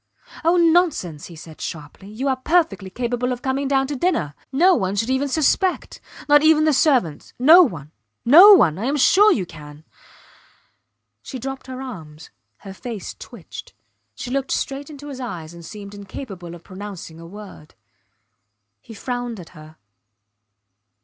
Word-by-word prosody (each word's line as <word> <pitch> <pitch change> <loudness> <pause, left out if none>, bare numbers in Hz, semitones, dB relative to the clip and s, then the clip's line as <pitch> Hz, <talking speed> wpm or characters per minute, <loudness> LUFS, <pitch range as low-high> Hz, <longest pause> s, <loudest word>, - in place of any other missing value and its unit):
Oh, 335 +2 +3
nonsense! 325 - +1
he 170 - -12
said, 160 0 -13
sharply. 160 +5 -8
You 235 +6 -4
are 265 - +2
perfectly 310 - 0
capable 245 +3 -2
of 245 0 -5
coming 270 +1 -1
down 270 -1 +2
to 285 +2 -4
dinner. 250 - -1 0.2
No 350 +8 +4
one 190 - -1
should 225 +5 -1
even 265 +2 0
suspect; 320 +6 0 0.3
not 295 0 +6
even 310 0 +4
the 310 -1 +3
servants. 255 - +1
No 315 +9 +8
one! 160 - -2 0.3
No 345 - +9
one!... 170 - +4
I 220 - -3
am 285 +3 0
sure 410 +9 +5
you 195 - 0
can. 150 -2 -13 1.4
She 265 - -8
dropped 270 +2 -7
her 260 0 -7
arms; 160 -11 -10 0.3
her 195 - -8
face 220 0 -7
twitched. - - -12 0.4
She 245 - -7
looked 270 0 -2
straight 275 +1 -3
into 290 -1 -10
his 275 -3 -8
eyes 175 -10 -7
and 170 0 -12
seemed 200 +3 -10
incapable 195 -3 -9
of 170 - -15
pronouncing 190 -4 -9
a 165 - -11
word. 200 -5 -13 1.1
He 225 - -13
frowned 245 -1 -5
at 170 - -11
her. 155 -1 -15
245 Hz, 160 wpm, -21 LUFS, 180-285 Hz, 1.4 s, No